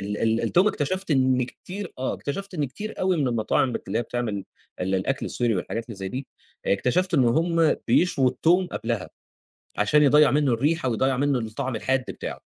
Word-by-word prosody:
ال 105 +1 -3
ال 115 0 +1
التوم 185 +4 +3
اكتشفت 185 +2 -2
إن 130 -2 +3
كتير 185 +8 -8
آه 130 - -1
اكتشفت 195 +6 -5
إن 150 - 0
كتير 205 - -7
أوي 185 -1 +2
من 140 -5 +1
المطاعم 120 +2 +1
بت - - -6
اللي - - 0
هي - - 0
بتعمل 110 -5 -3 0.4
ال 95 +1 0
الأكل 95 +9 -1
السوري 120 -3 0
والحاجات 115 +5 -3
اللي 115 - -8
زي 95 0 -4
دي، 130 +6 -5 0.4
اكتشفت 170 - +1
إن 135 -5 +4
هُم 165 +5 +2
بيشووا 140 -7 +3
التوم 175 +8 +2
قبلها، 115 - -3 0.7
عشان 125 +9 +3
يضيّع 150 +1 +6
منّه 145 -2 +2
الريحة 145 +5 +1
ويضيّع 130 +3 +1
منّه 140 0 +1
الطعم 120 +2 -3
الحاد 130 +3 0
بتاعه، - - -6
130 Hz, 185 wpm, -25 LUFS, 115-160 Hz, 0.7 s, يضيّع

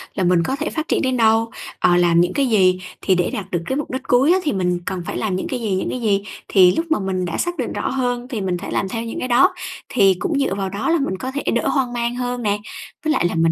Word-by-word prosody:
là 190 - 0
mình 175 -1 +3
có 265 - -1
thể 310 +2 -3
phát 315 0 -4
triển - - +1
đến 260 -2 0
đâu, 225 0 +3 0.3
ờ, 175 - +4
làm 170 -1 +4
những 180 +1 +1
cái 275 -2 +1
gì, 185 -4 +4 0.2
thì 190 - +2
để 180 -1 +1
đạt 195 -2 -5
được 175 - -1
cái 265 - -2
mục 295 - -3
đích 260 +1 -4
cuối 265 +7 +4
á 375 - +3
thì 295 - 0
mình 180 -2 0
cần 185 -1 -3
phải - - -4
làm 210 -4 -1
những 185 - -3
cái 255 - -3
gì, 215 -5 -1
những 190 - -2
cái 255 - -4
gì. 200 -3 +1 0.2
Thì 185 -2 +5
lúc 330 - 0
mà - - +3
mình 190 -2 -2
đã 170 - -3
xác 350 0 -2
định - - -3
rõ - - -2
hơn 245 -2 -1
thì 240 -6 -4
mình 185 -2 -1
thể 190 - -7
làm 190 - -1
theo 225 +3 -3
những 230 - -5
cái - - -2
đó, 250 +10 +4 0.4
thì 195 -5 +4
cũng 290 - 0
dựa 270 -8 0
vào 195 -1 -2
đó 200 - -2
là 335 - +4
mình 230 -9 -2
có 255 +7 -4
thể 285 +2 -4
đỡ - - 0
hoang 260 -4 0
mang 240 0 -1
hơn 245 -1 -3
nè. 205 -1 +1 0.5
Với 310 - +3
lại - - +1
là 175 - 0
mình 165 0 +3
220 Hz, 300 wpm, -20 LUFS, 185-260 Hz, 0.5 s, Thì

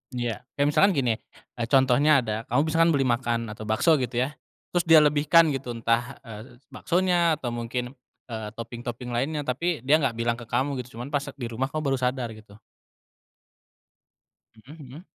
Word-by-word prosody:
Iya. 120 -3 -2 0.2
Kayak 140 +1 +2
misalkan 195 +7 +4
gini, 125 -4 +1 0.5
eee, 115 - -1
contohnya 135 +3 +4
ada, 110 -1 -2
kamu 125 +4 +2
misalkan 165 +1 +4
beli 135 - +2
makan 115 -2 -1
atau 105 0 -8
bakso, 145 +8 +3
gitu 125 -1 -3
ya, 140 - -3 0.4
terus 175 -1 0
dia 160 -2 +8
lebihkan, 150 +2 +4
gitu, 130 -3 -4
entah, 115 +3 0
eee, 115 +1 -11 0.2
baksonya, 175 -2 +1
atau 125 -5 -5
mungkin, 120 +1 -4 0.4
eee, 110 -1 -5
topping-topping 120 +1 -7
lainnya, 145 +5 -1
tapi 145 +2 -2
dia 150 +4 +4
nggak 135 -6 0
bilang 115 +1 -1
ke 120 - -10
kamu, 135 +2 -1
gitu. 125 -2 -9
Cuman 125 +4 -7
pas 145 - +1
se 140 - -8
di 125 -4 -5
rumah 130 +4 -1
kamu 155 +2 -4
baru 135 - +1
sadar, 125 -2 -1
gitu. 110 -2 -14 2.0
Mhm 125 +7 -14
mhm. 150 +9 -12
125 Hz, 180 wpm, -25 LUFS, 115-150 Hz, 2.0 s, dia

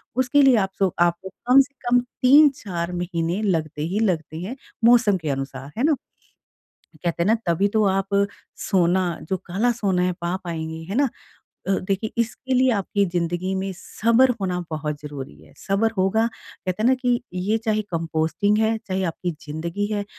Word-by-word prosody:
उसके 260 +3 +3
लिए 270 -2 +6
आपसो 190 -2 0
आपको 175 +2 +1 0.2
कम 255 +2 +7
से 275 +1 -5 0.2
कम 245 0 +5 0.2
3-4 255 - +4
महीने 175 +1 -2
लगते 160 -6 -1
ही 195 +5 -1
लगते 165 -7 -1
हैं 210 +8 -5 0.3
मौसम 230 -4 +5
के 160 -4 -4
अनुसार। 135 0 -4
है 240 - 0
ना? 305 0 +4 1.1
कहते 170 -1 0
हैं - - 0
ना 220 - +5
तभी 170 +3 +2
तो 215 - +4
आप 195 0 0 0.6
सोना 185 -1 +3 0.2
जो 190 - 0
काला 205 +7 +1
सोना 200 -6 0
है 180 0 +1
पा 170 +1 -1
पाएँगे, 160 -2 -5
है 200 - -3
ना? 275 +1 +3 0.6
अ, - - +2
देखिए 195 +3 -1
इसके 250 +3 -1
लिए 255 +1 +4
आपकी 200 -1 0
ज़िंदगी 175 +1 -2
में 190 0 -2
सब्र 230 +7 +2
होना 180 -2 -1
बहुत 150 -1 -3
ज़रूरी 145 - -7
है। 80 - -19
सब्र 200 +3 +1
होगा 195 +5 +2
कहते 210 -3 -6
हैं - - +3
ना 260 - +5
कि 250 -2 0
ये 195 +5 0
चाहे 215 -1 +1
कंपोस्टिंग 165 +5 0
है, 220 +1 +2
चाहे 190 -3 -3
आपकी 175 +1 -2 0.2
ज़िंदगी 170 +7 -3
है। 205 -1 -1
190 Hz, 175 wpm, -23 LUFS, 170-225 Hz, 1.1 s, कम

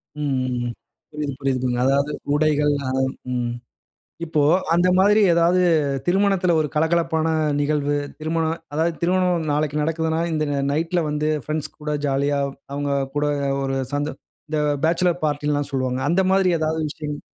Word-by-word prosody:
ம் 130 -4 -1 0.4
புரியுது, 150 -2 -3
புரியுது. 130 -2 0 0.2
அதாவது 140 +2 +2 0.2
உடைகள் 150 -1 +2 0.2
அ, - - -1 0.4
ம். 120 -1 -1 0.7
இப்போ 155 -2 0 0.3
அந்தமாரி 185 +5 +4
ஏதாவது 170 +2 +3 0.5
திருமணத்துல 190 -1 +2
ஒரு 150 - 0
கலகலப்பான 160 0 +1 0.3
நிகழ்வு. 145 0 0 0.2
திருமண 160 +1 -1 0.3
அதாவது 160 +3 +1
திருமணம் 180 -2 +1
நாளைக்கு 150 0 0
நடக்குதுனா, 160 +1 0
இந்த 155 -1 0
ந 140 - 0 0.2
நைட்‌ல 165 +3 0
வந்து 150 +1 -1 0.2
ஃபிரெண்ட்ஸ் 155 0 -4
கூட 150 0 -3
ஜாலியா 140 +1 +1 0.3
அவுங்க 145 0 -2 0.2
கூட 145 0 +1 0.4
ஒரு 135 0 -1 0.2
சந்தோ 145 +2 -1 0.4
இந்த 155 -1 0 0.2
பேச்சிலர் 175 +1 +2
பார்ட்டில்லாம் 145 -1 -1
சொல்வாங்க. 130 -1 -1
அந்த 175 +5 +3
மாதிரி 190 -1 +3
ஏதாவது 160 0 -1
விஷயங் 150 -1 -6
150 Hz, 130 wpm, -22 LUFS, 145-165 Hz, 0.7 s, அந்தமாரி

